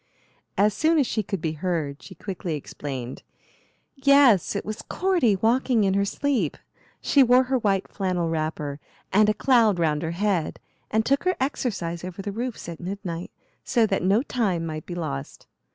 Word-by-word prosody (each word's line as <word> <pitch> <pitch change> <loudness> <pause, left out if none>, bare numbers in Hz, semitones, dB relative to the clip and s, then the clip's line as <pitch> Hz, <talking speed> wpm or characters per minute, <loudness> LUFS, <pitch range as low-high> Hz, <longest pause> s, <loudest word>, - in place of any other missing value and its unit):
As 210 +1 +4
soon 320 +7 +2
as 285 - +4
she 220 - -1
could 195 -3 -4
be 160 -3 -1
heard 155 -3 -3
she - - -12
quickly 185 -4 -4
explained: 135 -3 -6 0.7
"Yes, 270 - +5
it 200 - -3
was 215 +1 -5
Cordy, 350 - +1
walking 230 +2 +2
in 195 -1 +2
her 200 0 +2
sleep. 230 - -1 0.4
She 280 - +4
wore 250 0 +6
her 260 0 0
white 195 -4 +1
flannel 180 -3 -1
wrapper, 155 -3 -3 0.3
and 210 +2 +5
a - - +3
cloud 230 -7 +4
round 155 -3 +1
her 160 - -2
head, 195 -5 0 0.3
and 220 +1 +1
took 275 +1 +2
her 370 - +2
exercise 195 - -2
over 185 +2 -6
the 205 - -3
roofs 235 0 -5
at 170 -2 -7
midnight, 180 -2 -5 0.3
so 235 -4 +2
that 195 -2 0
no 200 +7 +3
time 195 - -1
might 155 -1 -6
be 175 - -5
lost. 140 -5 -5
195 Hz, 175 wpm, -25 LUFS, 165-240 Hz, 0.7 s, wore